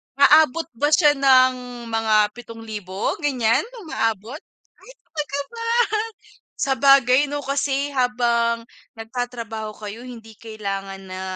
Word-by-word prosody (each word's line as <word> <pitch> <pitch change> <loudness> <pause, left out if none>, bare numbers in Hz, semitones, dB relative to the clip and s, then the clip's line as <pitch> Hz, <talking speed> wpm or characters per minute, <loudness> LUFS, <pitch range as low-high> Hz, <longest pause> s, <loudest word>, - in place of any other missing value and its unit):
Aabot 305 +2 +5 0.2
ba 290 - +3
siya 300 0 +5
ng 260 -2 +4 0.4
mga 215 -2 +2
7,000 220 -5 -5
ganyan, 255 - +1 0.2
umaabot? 225 - -2 0.4
Ay! - - -17
Talaga 290 -3 -5
ba? 460 0 -6 0.9
Sabagay 270 -1 +4
no 290 0 -4
kasi 280 +1 -1
habang 235 -3 +1 0.3
nagtatrabaho 225 -2 -5
kayo 215 +4 -8
hindi 225 -3 -11
kailangan 195 -3 -6
na 185 0 -7
245 Hz, 105 wpm, -22 LUFS, 220-275 Hz, 0.9 s, Aabot